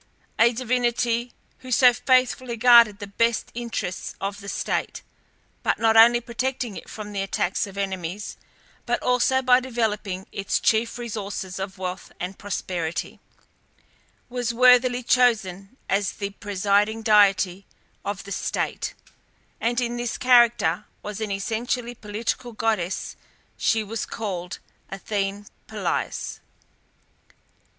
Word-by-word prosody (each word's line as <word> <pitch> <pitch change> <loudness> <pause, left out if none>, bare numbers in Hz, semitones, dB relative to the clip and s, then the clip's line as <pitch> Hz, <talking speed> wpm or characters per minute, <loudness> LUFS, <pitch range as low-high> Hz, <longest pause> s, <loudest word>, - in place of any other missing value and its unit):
A 235 +1 +6
divinity 240 0 0 0.3
who 255 0 -10
so 250 -1 +6
faithfully 255 -1 +1
guarded 235 -3 +7
the 205 - -6
best 230 +3 0
interests 230 -6 -4
of 200 +1 -4
the 200 -1 -8
state, - - -2 0.6
by - - +1
not 225 -1 +3
only 235 +2 +8
protecting 240 -1 -3
it - - -9
from 210 -1 -7
the 200 - -1
attacks 195 0 -1
of 200 0 -11
enemies, 190 0 -4 0.5
but - - +1
also 250 +1 +2
by 250 0 +6
developing 210 -7 -2
its 195 -1 -1
chief 230 +2 +1
resources 205 -5 -5
of 190 0 -5
wealth 185 0 -5
and 185 +2 -5
prosperity, 175 -4 -4 1.1
was 245 -1 -2
worthily 250 0 +5
chosen 220 -4 +1
as 195 0 0
the 200 -1 -4
presiding 205 +2 0
deity 195 -3 +3 0.4
of 200 -1 -4
the 200 - -10
state, - - -2 0.6
and 240 +1 0
in 240 -1 -2
this 240 -1 -3
character 240 -2 +4 0.2
as 210 +1 -5
an 215 - -2
essentially 230 +4 -2
political 230 +3 -4
goddess 215 -5 -1 0.4
she 225 -1 +1
was 220 +2 -4
called 180 -5 -5 0.3
Athene 200 +1 -3 0.2
Polias. - - -3
220 Hz, 125 wpm, -24 LUFS, 200-240 Hz, 1.1 s, only